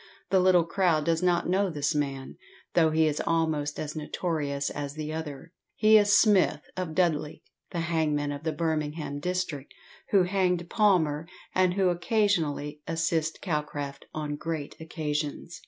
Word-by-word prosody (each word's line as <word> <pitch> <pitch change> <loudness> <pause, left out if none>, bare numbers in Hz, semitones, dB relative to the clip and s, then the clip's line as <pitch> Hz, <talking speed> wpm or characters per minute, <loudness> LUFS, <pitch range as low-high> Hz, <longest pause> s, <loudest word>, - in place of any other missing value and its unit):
The 190 - +5
little 180 -2 +5
crowd 170 -3 +1
does 165 0 +1
not 175 -1 +2
know 190 +2 +2
this 150 -2 -1
man, 140 -3 -3 0.4
though 160 -2 +4
he 160 0 +3
is 150 -1 0
almost 160 -3 0
as 150 0 -4
notorious 150 -3 -2
as 145 -1 -5
the 155 0 -4
other. 160 0 -6 0.2
He 215 0 +5
is 205 -1 +6
Smith, 195 -8 +4
of 180 -4 -4
Dudley, 160 -5 0 0.3
the 170 - -3
hangman 155 -3 0
of 145 0 -5
the 160 0 -1
Birmingham 150 -3 -2
district, 175 -4 -3 0.3
who 195 -3 +5
hanged 180 -2 0
Palmer, 165 -8 +2 0.3
and 185 -1 +2
who 190 -2 +3
occasionally 175 -7 0
assists 165 -1 0
Calcraft 150 -4 -4
on 150 -1 -4
great 160 -2 -4
occasions. 155 0 -4
160 Hz, 150 wpm, -28 LUFS, 150-180 Hz, 0.4 s, is